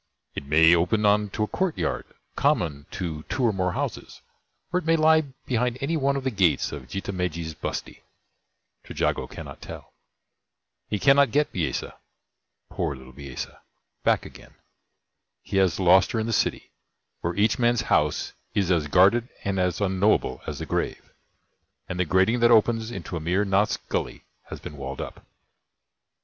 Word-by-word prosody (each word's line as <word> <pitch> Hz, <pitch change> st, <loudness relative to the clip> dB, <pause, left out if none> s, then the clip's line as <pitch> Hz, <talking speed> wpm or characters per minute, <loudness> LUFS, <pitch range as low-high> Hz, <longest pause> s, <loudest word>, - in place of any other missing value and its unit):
It 70 Hz, -, -6 dB
may 80 Hz, +3 st, +6 dB
open 90 Hz, +6 st, +1 dB
on 105 Hz, 0 st, +3 dB
to 105 Hz, -, -2 dB
a -, -, 0 dB
courtyard 185 Hz, -, -1 dB, 0.3 s
common 75 Hz, -4 st, 0 dB
to 85 Hz, -7 st, -4 dB
two 130 Hz, -, -1 dB
or 115 Hz, -3 st, +3 dB
more 90 Hz, -2 st, -1 dB
houses, -, -, -5 dB, 0.5 s
or 180 Hz, -, +3 dB
it -, -, -9 dB
may 165 Hz, -, +5 dB
lie 160 Hz, 0 st, +5 dB, 0.2 s
behind 125 Hz, 0 st, 0 dB
any 145 Hz, +5 st, -1 dB
one 140 Hz, -2 st, +1 dB
of 135 Hz, -, -3 dB
the 130 Hz, -, 0 dB
gates 90 Hz, -, +2 dB
of 70 Hz, -4 st, -8 dB
Jitha 95 Hz, +1 st, -4 dB
Megji's 85 Hz, -3 st, -3 dB
bustee. 75 Hz, -, -5 dB, 0.8 s
Trejago -, -, -1 dB
cannot -, -, -9 dB
tell. -, -, -10 dB, 1.0 s
He 105 Hz, -, 0 dB
cannot 140 Hz, +4 st, +5 dB
get 150 Hz, +6 st, +1 dB
Bisesa 80 Hz, -8 st, -3 dB, 0.7 s
poor 70 Hz, -, -2 dB
little 65 Hz, 0 st, -13 dB
Bisesa 70 Hz, -1 st, -7 dB, 0.4 s
back -, -, +2 dB
again. -, -, -14 dB, 0.9 s
He 95 Hz, +1 st, -3 dB
has 95 Hz, -2 st, +2 dB
lost 95 Hz, 0 st, +5 dB
her 115 Hz, -, 0 dB
in 110 Hz, -, -1 dB
the 115 Hz, -, -2 dB
City, -, -, 0 dB, 0.5 s
where 85 Hz, +1 st, -3 dB
each 105 Hz, +3 st, +2 dB
man's 120 Hz, -1 st, +3 dB
house -, -, +1 dB, 0.2 s
is 95 Hz, -3 st, +1 dB
as 80 Hz, -4 st, +2 dB
guarded 100 Hz, -, +4 dB
and 100 Hz, -1 st, -1 dB
as 90 Hz, -2 st, 0 dB
unknowable 100 Hz, +1 st, +1 dB
as 75 Hz, -, -4 dB
the 80 Hz, -, -5 dB
grave; -, -, -3 dB, 0.8 s
and 90 Hz, -, -5 dB
the 90 Hz, -, +2 dB
grating 95 Hz, +8 st, +3 dB
that 120 Hz, 0 st, +5 dB
opens 115 Hz, 0 st, +3 dB
into 115 Hz, -6 st, -6 dB
Amir 90 Hz, +6 st, 0 dB
Nath's 100 Hz, +1 st, +2 dB
Gully -, -, -4 dB, 0.2 s
has -, -, -8 dB
been 75 Hz, -, -9 dB
walled 70 Hz, 0 st, -6 dB
up. -, -, -7 dB
95 Hz, 165 wpm, -25 LUFS, 85-115 Hz, 1.0 s, may